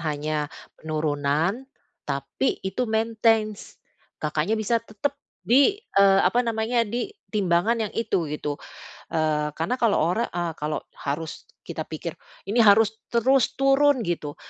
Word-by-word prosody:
hanya 150 -1 -2 0.3
penurunan, 155 - -1 0.4
tapi 140 - -1
itu 205 +6 -2
maintains. 220 -1 +1 0.4
Kakaknya 155 +8 -1
bisa 225 +2 +1
tetap 230 +6 -3 0.3
di 275 - +5
eee, 195 - +3
apa 215 +7 +3
namanya, 230 0 +1
di 245 - -3 0.2
timbangan 200 +2 +2
yang - - -10
itu, 195 -7 0
gitu. 150 -1 -3 0.5
Eee, 150 -2 0
karena 240 +11 -2
kalau 230 -3 +3
ora 185 +9 +1
eee, 175 -1 -3
kalau 150 +1 -2 0.2
harus 150 +3 -4 0.2
kita - - -6
pikir, - - -5 0.4
ini 235 - +2
harus 220 0 +5
terus 255 +2 +2
turun, 275 -1 +3
gitu, 160 -5 -3
205 Hz, 130 wpm, -25 LUFS, 155-235 Hz, 0.5 s, di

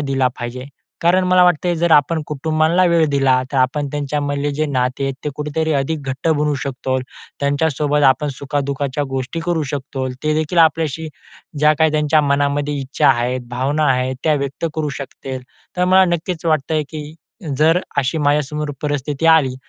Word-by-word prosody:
दिला 135 -2 +1
पाहिजे. 125 +1 -5 0.4
कारण 180 +2 +3
मला 180 0 +5
वाटतं 180 0 +2
आहे 175 - +1
जर 170 +1 +1
आपण 155 +2 +3
कुटुंबांना 155 +4 +1
वेळ 165 -2 +4
दिला 135 -2 +3
तर - - -1
आपण 140 +3 +1
त्यांच्यामधले 145 0 -2
जे 155 +2 0
नाते 130 -1 -1
आहेत 135 -1 -2
ते - - 0
कुठेतरी 150 +2 -2
अधिक 155 +3 -2
घट्ट 135 +5 -2
बनू 150 -1 +1
शकतो. 130 -1 -2 0.4
त्यांच्यासोबत 145 0 +1
आपण 150 +2 -4
सुखादुःखाच्या 140 0 -2
गोष्टी 135 +5 -3
करू 170 -3 0
शकतोल. 130 -2 -4
ते 155 0 +1
देखील 155 +3 -1
आपल्याशी 160 -1 +2 0.5
ज्या 150 +1 +5
काही 160 -1 +3
त्यांच्या 150 0 +3
मनामध्ये 145 0 0
इच्छा 135 +1 +1
आहेत, 125 0 +1
भावना 140 +5 0
आहेत 130 +1 -1
त्या 155 -1 +3
व्यक्त 140 +3 -3
करू 155 -2 -1
शकतील. 130 -1 -7 0.3
तर 180 - +2
मला 190 +1 +5
नक्कीच 170 0 -4
वाटतं 155 0 +1
आहे 155 - +2
की 155 0 -7 0.4
जर 160 +3 +4 0.2
अशी 140 +4 0
माझ्यासमोर 150 0 0
परिस्थिती 145 +1 -2
आली 155 -6 +5
145 Hz, 170 wpm, -19 LUFS, 135-160 Hz, 0.5 s, मला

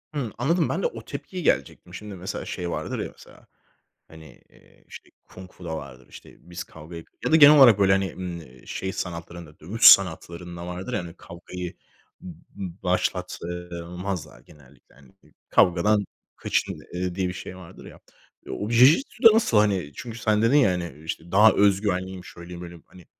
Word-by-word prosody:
Hımm, 130 -7 -3
anladım. 165 +8 +1
Ben - - -2
de - - +3
o 480 - -9
tepkiyi 185 -2 -7
gelecektim. 70 - -1
Şimdi 105 +1 -8
mesela 90 0 -6
şey 90 -1 -5
vardır - - -4
ya: - - -3
Mesela, - - -18 0.6
hani, 80 -1 -15
eee, - - -24
işte, - - -13 0.2
Kung 95 0 -13
Fu'da 85 -3 -6
vardır. 65 -4 -11
İşte, - - -14
biz 90 0 -8
kavgayı 80 +1 -11
g - - -33 0.2
ya - - 0
da - - +6
genel 150 -1 +9
olarak 120 -7 +8
böyle, 95 -1 +4
hani, 95 -2 0 0.5
iii, - - -20
şey 95 - -4
sanatlarında, 85 -2 -7
dövüş 100 +9 -6
sanatlarında 85 -1 +4
vardır 90 +7 -6
ya - - 0
hani 85 -2 -8
kavgayı 90 +1 -8 0.5
b 90 +2 -10
başlat, 90 0 -1
eee, 90 -1 -6
mazlar 90 -5 -6
genellikle 70 -2 -21
hani. 70 -2 -20
I - - -25 0.2
"Kavgadan 100 +4 +3 0.3
kaçın!" - - -2
eee, 90 0 -3
diye 95 -1 -1
bir 90 - -4
şey 90 0 -8
vardır 90 -3 -13
ya. - - -13 0.5
O 105 - -4
Jijitsu'da 190 - +5
nasıl 220 - +2
hani? 100 -8 +1
Çünkü 115 -2 -8
sen 110 -1 +1
dedin 115 +6 +4
ya 130 -10 +4
hani, 85 -4 -5
işte, 80 +1 -6
"Daha 105 +3 +7
öz 100 -1 +3
güvenliyim, 95 -2 -3
şöyleyim, 85 0 -10
böyleyim." 85 -1 -11
Hani, 90 -2 -17
90 Hz, 180 wpm, -24 LUFS, 85-105 Hz, 0.6 s, genel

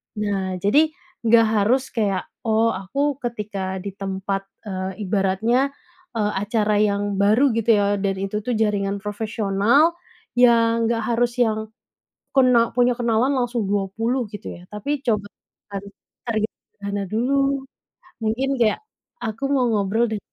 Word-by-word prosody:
Nah, 195 -3 -1
jadi 210 +9 +5 0.5
nggak 230 0 +6
harus 245 +6 +2
kayak, 200 -5 -1 0.2
oh 225 +1 +3
aku 275 +9 -2
ketika 200 -6 -4
di 200 - -4
tempat, 195 0 -4 0.2
eee, 190 0 -4
ibaratnya, 215 +8 +1 0.4
eee, 210 -2 +1
acara 210 -1 +1
yang 205 -1 +1
baru 225 +7 +4
gitu 230 +1 -1
ya, 205 -1 +2
dan 195 -1 0
itu 195 +2 -2
tuh 250 - 0
jaringan 200 -2 0
profesional, 215 +8 +2 0.4
yang 230 -1 +4
nggak 230 -1 0
harus 240 +1 +1
yang 220 -2 +2 0.7
kena 250 -4 +4
punya 245 0 +3
kenalan 240 +3 +2
langsung 240 -5 -1
20 225 +6 0
gitu 210 - -7
ya. 175 - -14
Tapi 275 +7 -3
coba 210 -3 +1 0.4
kan 200 -1 -5 0.4
target 220 -2 0 0.3
dana 200 0 -3
dulu. 270 +6 0 0.6
Mungkin 240 +5 0
kayak, 220 -2 +3 0.4
aku 225 +4 -4
mau 255 -3 +3
ngobrol 215 +2 +1
deh 215 -2 -2
220 Hz, 135 wpm, -22 LUFS, 200-240 Hz, 0.7 s, nggak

